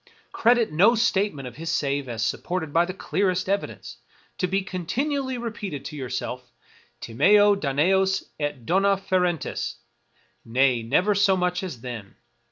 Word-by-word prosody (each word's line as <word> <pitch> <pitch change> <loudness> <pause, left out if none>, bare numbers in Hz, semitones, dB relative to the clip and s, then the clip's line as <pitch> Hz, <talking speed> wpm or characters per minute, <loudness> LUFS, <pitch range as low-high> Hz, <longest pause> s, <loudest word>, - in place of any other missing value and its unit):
Credit 235 -3 +3
no 200 +10 +5
statement 200 - 0
of 125 - -11
his 165 +1 -5
save 140 -4 -1
as 115 -1 -2
supported 160 +4 -3
by 170 +1 +4
the 185 - -5
clearest 185 +1 -1
evidence; 200 +1 -3 0.4
be 190 +1 0
continually 260 - -2
repeating 215 - -5
to 150 - -7
yourself, 125 -2 -5 0.3
" - - -33
Timeo 205 - +4
Danaos 190 +5 +1 0.2
et 145 -5 -3
dona 195 - +3
ferentes," 180 -4 -1 0.4
— - - -40 0.3
nay, 125 +1 +2
never 180 - +2
so 200 -1 +3
much 180 0 0
as 170 -12 -6
then. 115 -5 -8
180 Hz, 145 wpm, -24 LUFS, 140-200 Hz, 0.4 s, no